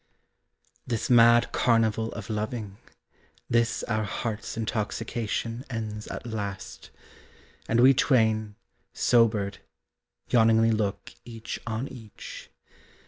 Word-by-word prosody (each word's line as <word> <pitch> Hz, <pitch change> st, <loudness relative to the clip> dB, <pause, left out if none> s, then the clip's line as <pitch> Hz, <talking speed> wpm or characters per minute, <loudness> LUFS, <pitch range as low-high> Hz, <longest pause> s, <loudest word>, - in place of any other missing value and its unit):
This 120 Hz, +1 st, -2 dB
mad 120 Hz, 0 st, +6 dB
carnival 115 Hz, -1 st, +2 dB
of 105 Hz, -3 st, -7 dB
loving, 105 Hz, -1 st, -4 dB, 0.7 s
This 115 Hz, 0 st, +1 dB
our 110 Hz, -1 st, -1 dB
heart's 110 Hz, +1 st, -4 dB
intoxication 115 Hz, +1 st, -3 dB
Ends 110 Hz, -3 st, -5 dB
at -, -, -7 dB
last, 100 Hz, -, -6 dB, 0.8 s
and 115 Hz, -, +2 dB
we 130 Hz, +3 st, +7 dB
twain, 110 Hz, -5 st, +2 dB, 0.4 s
sobered, 110 Hz, -4 st, +2 dB, 0.7 s
Yawningly 115 Hz, -1 st, +4 dB
look 105 Hz, -3 st, -2 dB
each 115 Hz, -2 st, -7 dB
on 115 Hz, +4 st, -2 dB
each. 115 Hz, -7 st, -10 dB
115 Hz, 95 wpm, -27 LUFS, 105-115 Hz, 0.8 s, we